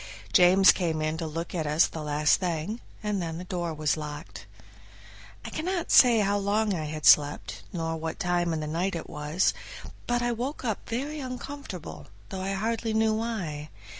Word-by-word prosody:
James 185 +2 +7
came 165 -4 -1
in 155 0 -1
to 165 -1 -3
look 165 +2 -5
at 160 -4 -2
us 150 +3 +4
the 160 - -6
last 150 0 +2
thing, 180 +5 -2 0.2
and 210 -2 -1
then 165 -1 -4
the 175 - -6
door 175 -2 -3
was 155 -1 0
locked. 150 +1 -8 1.0
I - - -6
cannot 345 +2 -2
say 235 -4 +7
how 205 0 +1
long 205 +1 +1
I 160 -4 -2
had 155 0 -5
slept, 145 0 +4
nor 165 -2 -2
what 160 0 -5
time 175 -1 +1
in 160 -1 -2
the - - -3
night 170 +5 -1
it 165 - -5
was, 150 +5 0 0.5
but 240 0 +1
I 240 - +1
woke 250 +4 -4
up 220 -4 -3
very 280 +6 -3
uncomfortable, 255 - -7 0.2
though 190 - -5
I 195 +1 -2
hardly 220 +2 -1
knew 220 0 +3
why. 190 -10 -3
180 Hz, 185 wpm, -27 LUFS, 160-220 Hz, 1.0 s, James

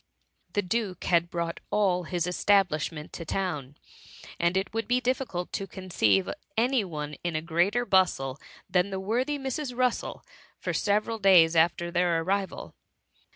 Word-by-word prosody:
The 205 - +1
duke 190 -1 -2
had 170 -1 +2
brought 170 -1 -3
all 185 -4 +1
his 175 0 -1
establishment 180 -5 +1
to 170 - -6
town; 150 -6 -3 0.6
and 170 +2 +2
it 190 +2 -2
would 225 0 -2
be 245 +1 +3
difficult 250 -8 -2
to 195 - -3
conceive 185 0 +1 0.3
any 245 0 +3
one 150 -5 -5
in 175 -2 -2
a 155 - 0
greater 180 +9 +1
bustle 175 - +2 0.3
than 180 +1 +2
the 190 -1 -3
worthy 245 +9 -1
Mrs. 270 -1 -4
Russel 250 -2 -1 0.3
for - - -3
several 215 +2 0
days 175 -5 +6
after 170 +1 +2
their 175 -1 +2
arrival. 195 +2 -2
185 Hz, 150 wpm, -27 LUFS, 170-210 Hz, 0.6 s, days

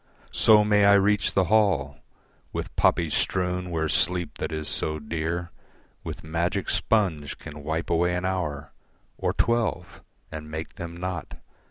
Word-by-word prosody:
So 105 -1 +6
may 105 -1 +4
I 100 - +7
reach 100 +1 +3
the 95 - +4
hall 105 +2 +2 0.5
With - - -5
poppies 80 -4 +2
strewn 90 -1 0
where 80 -2 -1
sleep 90 +2 0
that - - -3
is 80 -1 -4
so 75 0 -1
dear 85 +3 -3 0.5
With - - -6
magic 85 +4 -1
sponge 90 -10 0
can 75 0 -9
wipe 80 +2 -2
away 90 +1 +2
an 90 +1 -2
hour 75 -6 -2 0.5
Or - - +1
twelve 115 -1 0 0.3
and 75 -1 -7
make 80 +1 -6
them 85 0 -6
naught. 90 -1 -5
85 Hz, 150 wpm, -26 LUFS, 80-95 Hz, 0.5 s, I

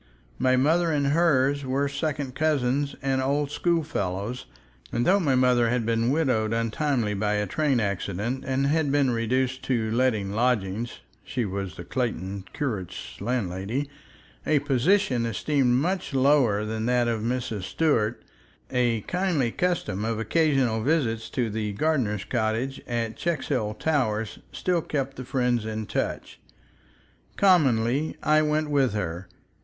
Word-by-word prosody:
My 130 0 +3
mother 160 +6 +3
and 145 -2 +1
hers 145 -3 +3
were 135 +2 0
second 140 -2 -3
cousins 140 -2 0
and 135 -1 +1
old 140 +2 0
schoolfellows, 125 - -1 0.4
and 120 - 0
though 195 +2 +4
my 145 -8 +2
mother 125 -2 +3
had 120 -1 0
been 115 +1 +1
widowed 125 -7 +1
untimely 115 0 0
by 105 +1 0
a 105 0 0
train 145 0 +1
accident, 100 +5 -2
and 135 0 0
had 145 0 +1
been 140 -3 +3
reduced 130 +3 0
to 115 -4 0
letting 115 -5 +1
lodgings 115 -1 -1 0.2
(she 125 -4 -2
was 95 -1 -4
the 85 - -8
Clayton 100 -3 -3
curate's 95 - -5
landlady), 115 +4 -2 0.5
a 155 - +2
position 140 0 +2
esteemed 125 +3 +1
much 170 +2 -1
lower 130 -6 +3
than 110 +1 -2
that 125 -1 +2
of 115 -2 -1
Mrs. 115 -3 -2
Stuart, 115 -8 0 0.5
a 120 -3 +1
kindly 175 - 0
custom 175 - -1
of 115 0 -1
occasional 130 -2 +2
visits 120 -5 0
to 120 -2 -1
the 105 -1 -3
gardener's 110 -6 0
cottage 120 +3 -1
at 115 -2 -2
Checkshill 135 -10 -1
Towers 110 -9 0
still 180 -2 0
kept 135 -3 -3
the 130 - -6
friends 125 -3 0
in 110 0 -4
touch. - - -3 1.0
Commonly 140 - +3
I 155 0 +4
went 155 0 0
with 135 -6 +2
her. 90 -3 -3
125 Hz, 140 wpm, -26 LUFS, 110-145 Hz, 1.0 s, though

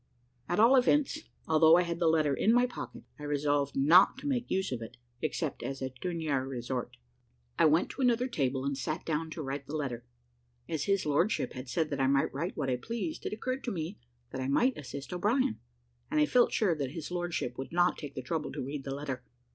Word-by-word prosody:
At 175 - +1
all 235 +5 +7
events, 290 +4 +2 0.2
although 160 +1 +6
I 180 - +4
had 170 -1 -3
the 170 - +3
letter 155 -3 +3
in 210 - +3
my 245 +1 +5
pocket, 250 - -7 0.2
I - - -8
resolved 145 -1 0
not 165 - +6
to 270 - -6
make 250 -4 -1
use 190 -3 0
of 125 -2 -3
it 115 +2 -9 0.2
except 155 0 -2
as 135 0 -4
a 130 -1 -3
dernier 160 -7 -1
resort. 125 -1 -4 0.6
I - - +6
went 160 +2 +3
to - - -6
another 245 -1 +3
table, 135 - -1
and 140 0 0
sat 155 +5 -3
down 160 0 -1
to 155 0 -5
write 140 0 -4
the 150 - -4
letter. 130 -6 -3 0.6
As 160 -4 -2
his 195 -3 +1
lordship 155 +8 +1
had 130 0 -7
said 160 +2 0
that 140 -1 -1
I 135 - +3
might 135 0 +2
write 165 +7 -3
what - - -1
I 125 - +1
pleased, 230 - -4
it - - -3
occurred 255 +4 -3
to 245 - -1
me 170 +2 -4 0.3
that 130 - -4
I 130 - -2
might 245 - +3
assist 140 +3 -7
O'Brien, 225 +7 +1 0.5
and 305 - +1
I 300 - +5
felt 250 -4 +4
sure 200 -6 +2
that 140 -4 -3
his 165 0 -6
lordship 175 -8 -2
would 135 - -5
not 175 +1 +3
take 145 -2 -7
the 130 - -4
trouble 155 +4 -2
to - - -4
read 140 +1 -5
the 135 0 -4
letter. 135 -3 -5
155 Hz, 225 wpm, -31 LUFS, 135-195 Hz, 0.6 s, all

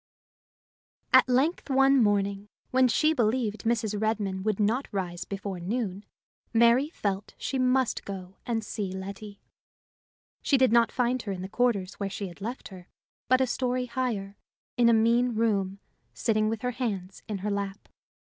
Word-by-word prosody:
At 260 0 +7
length 280 +7 +1
one 270 0 +5
morning, 200 -1 +1 0.2
when 255 0 +5
she 310 +7 +3
believed 225 -4 0
Mrs. 220 -3 0
Redmain 205 -3 -1
would 215 0 -1
not 225 +6 +1
rise 180 -4 -3
before 195 -2 -5
noon, 200 +1 -3 0.5
Mary 235 +5 +5
felt 200 - -3
she 270 - -3
must 255 0 +1
go 190 -1 -8
and 225 -2 -2
see 205 -2 -4
Letty. 200 +2 -8 1.0
She 275 - +3
did 260 -3 +4
not 235 -1 +4
find 250 0 0
her 205 - -5
in 185 -1 -5
the - - -4
quarters 200 -3 0
where 200 -1 -2
she 200 0 -4
had 175 - -15
left 235 +5 -5
her, 185 -2 -12 0.4
but 255 +2 +4
a - - +4
story 250 0 -1
higher, 235 -5 -3 0.4
in 240 -1 +4
a - - +5
mean 235 +2 +3
room, 200 -4 0 0.4
sitting 215 -2 +1
with 225 +1 -4
her 250 - 0
hands 200 -7 -4
in 210 -2 -3
her 210 - 0
lap. 200 0 -4
220 Hz, 165 wpm, -27 LUFS, 200-250 Hz, 1.0 s, At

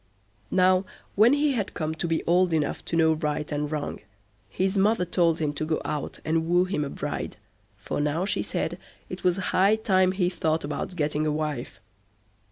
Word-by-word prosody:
Now, 185 0 +4 0.3
when 220 +6 +5
he 290 0 +2
had 220 -7 -2
come 155 -1 -2
to 160 +2 -3
be 165 -1 0
old 175 0 +3
enough 155 -2 -1
to - - -3
know 160 -1 +4
right 150 -1 -2
and 145 0 -2
wrong, 150 -2 -3 0.5
his 190 +2 -1
mother 200 0 +3
told 170 -2 +2
him 150 -3 -1
to 150 - -3
go 155 0 0
out 150 -1 -4
and 160 +1 0
woo 175 +1 +4
him 185 -5 -1
a 140 - -3
bride, - - -4 0.4
for - - -3
now 150 +5 0
she - - 0
said - - -3 0.3
it - - -7
was 180 0 +2
high 195 +2 +3
time 185 -4 +2
he 185 -2 +1
thought 160 -2 0
about 150 +5 -4
getting 155 -1 0
a - - +1
wife. 150 -9 -3
165 Hz, 190 wpm, -26 LUFS, 150-185 Hz, 0.5 s, when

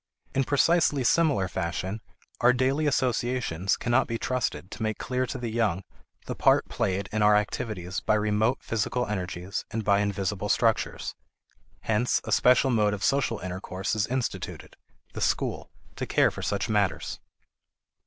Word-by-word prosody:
In 135 0 +1
precisely 145 -1 +3
similar 140 - +3
fashion, 95 +4 -3 0.4
our 125 +1 +5
daily 135 +4 +1
associations 120 - 0
cannot 120 +2 +2
be 115 - -2
trusted 120 -6 -2
to 110 - -8
make 110 -1 -1
clear 130 0 -2
to 130 - -4
the 120 -3 -4
young 110 -5 0 0.4
the - - -3
part - - +3
played 95 +1 -1
in 110 - -1
our 105 0 +6
activities 100 -3 -2
by 110 - +1
remote 105 +4 +1
physical 115 +3 -1
energies, 90 -2 -4
and 115 0 -3
by 100 -1 +3
invisible 100 0 -1
structures. 115 +1 +1 0.7
Hence 110 +3 +1
a - - -6
special 125 +1 +4
mode 105 -3 +2
of 100 - -7
social 135 -5 +1
intercourse 95 +2 -3
is 110 - 0
instituted, 130 0 -4 0.4
the - - -6
school, - - -1 0.3
to - - -3
care - - +3
for - - -7
such 100 0 -1
matters. 105 -3 0
110 Hz, 155 wpm, -27 LUFS, 100-125 Hz, 0.7 s, our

